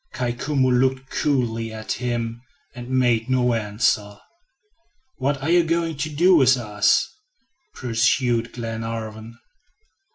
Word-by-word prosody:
Kai 120 -1 -2
Koumou 130 +1 0
looked 130 +1 +1
coolly 115 -6 -1
at 110 0 -6
him 120 -1 -3 0.3
and 120 0 -9
made 125 -3 +1
no 125 -2 +2
answer. 105 -1 0 1.0
"What 140 +1 -1
are 160 - 0
you 175 0 +5
going 165 0 -1
to 155 +2 -2
do 175 +5 +4
with 130 -2 +5
us?" 105 -3 +2 0.7
pursued 120 0 +1
Glenarvan. 115 -1 -6
120 Hz, 120 wpm, -22 LUFS, 115-130 Hz, 1.0 s, you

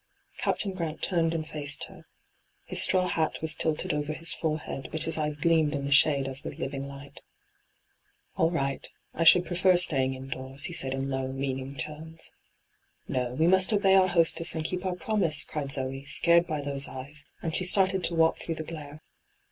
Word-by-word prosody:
Captain 195 -2 -1
Gh 185 - -7
ant 160 -1 -4
turned 165 -3 +1
and 160 -2 -3
faced 150 -1 -3
her. - - -13 0.6
His - - +4
straw 185 -1 +4
hat 160 -3 -1
was 160 0 +1
tilted 160 +2 -1
over 150 +1 -2
his 165 +2 +2
forehead, 155 -4 -4
but 155 - -1
hia 165 - 0
eyes 150 -1 -2
gleamed 160 -1 +2
in 140 -1 -3
the 140 - -4
shade 140 -1 +4
as 135 +1 -1
with - - -7
living 135 0 -4
light. 140 0 -11 0.6
' - - -44
All 165 - +2
right 140 -5 -2
J - - -12 0.2
I 165 - -1
should 175 +2 +7
prefer 180 +1 +3
staying 135 -7 +2
in 130 0 -9
doors/ 130 +1 -5
he 175 - -5
said 135 -5 0
in 135 +1 -3
low, 130 0 -2
meaning 135 0 -4
tones. 155 +5 -8 0.4
' - - -44
No; 125 -1 -2
we 160 - +2
must 190 +4 +4
obey 200 -2 +3
our 190 -1 +5
hostesa 165 -1 +3
and 160 -1 -3
keep 180 +3 -3
our 180 - -2
promise,' 180 -4 0
cried 145 -3 -5
Zoe, 135 0 -2
scared 170 +4 +4
by 155 -3 -3
those 140 -1 -2
eyes, 140 +3 -8 0.2
and 160 -1 -2
she - - +2
started 190 0 +2
to 170 - 0
walk 165 0 +3
through 165 - -4
the 160 - -5
glare. 155 -2 -9
155 Hz, 205 wpm, -27 LUFS, 140-170 Hz, 0.6 s, should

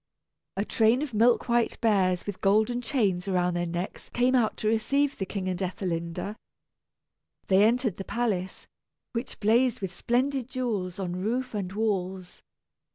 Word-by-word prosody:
A 200 - 0
train 230 +6 +3
of 285 -6 -6
milk 230 +3 +3
white 235 -1 +1
bears 190 -6 +2
with 205 -2 -6
golden 220 +5 +2
chains 205 -9 0
around 180 -2 +1
their 175 0 -1
necks 175 +3 -5
came 250 +1 +2
out 240 -4 +2
to 215 - -2
receive 275 +6 +1
the 195 - -4
king 195 -2 -4
and 185 0 -2
Ethelinda. 180 +2 -3 1.1
They 190 +1 +4
entered 230 -2 +2
the 195 - -4
palace, 200 -5 -2 0.5
which 235 +1 -4
blazed 235 +3 +3
with 190 -2 -4
splendid 255 +3 0
jewels 215 -9 -2
on 180 -2 -3
roof 245 +5 -1
and 195 -4 -3
walls. 190 -3 -2
210 Hz, 155 wpm, -27 LUFS, 185-240 Hz, 1.1 s, They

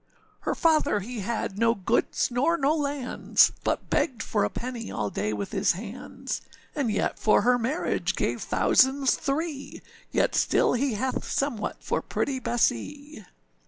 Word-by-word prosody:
âHer - - -1
father 305 -9 +3
he 235 +4 -6
had 205 -1 -3
no 230 0 +3
goods 225 +5 0
nor 280 +8 +2
no 290 +1 +2
lands, 285 -4 +2
But - - -2
begged 245 -8 0
for 205 -2 0
a - - +1
penny 240 -2 -5
all 105 -2 -3
day 105 - -2
with 105 -2 -4
his 195 -1 +2
hands, 210 +6 -6 0.3
And 280 -6 -1
yet 210 - -1
for 215 - +4
her 245 0 +4
marriage 260 +9 -1
gave - - -1
thousands 265 0 +3
three, 280 0 -3 0.3
Yet - - +2
still - - +3
he 250 -1 0
hath 255 +4 -2
somewhat 275 -6 -2
for - - -1
pretty 270 -2 -2
Bessee. 250 - -1
245 Hz, 155 wpm, -26 LUFS, 215-280 Hz, 0.3 s, for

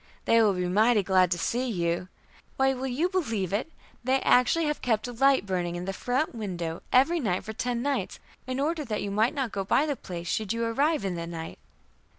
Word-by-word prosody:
They 230 0 +5
will 210 -3 +4
be 180 -1 -1
mighty 215 +3 +3
glad 185 -1 +3
to 175 - 0
see 245 +8 -1
you. 175 -3 -1 0.5
Why, 270 0 +3
will 260 +1 -4
you 275 +8 0
believe 230 - -2
it! 235 +10 -1 0.3
they 260 +2 +2
actually 250 +7 +4
have 300 0 -2
kept 225 -2 0
a - - -5
light 270 0 +3
burning 175 -3 -2
in 175 +1 -4
the 195 - -3
front 250 +9 -1
window 175 -7 -4
every 300 +7 +4
night 190 - -1
for 220 - -6
ten 240 +1 -2
nights, 285 0 -2 0.3
in 255 +1 -2
order 310 +2 0
that 220 -6 -3
you 200 - -3
might 220 +8 +2
not 265 -6 -2
go 195 - -2
by 265 +9 +2
the 290 -2 -1
place 175 -7 -7
should 215 +3 -1
you 230 0 -1
arrive 280 +2 +1
in 190 - -1
the 170 -1 -5
night." 165 -1 -7
230 Hz, 220 wpm, -27 LUFS, 185-265 Hz, 0.5 s, They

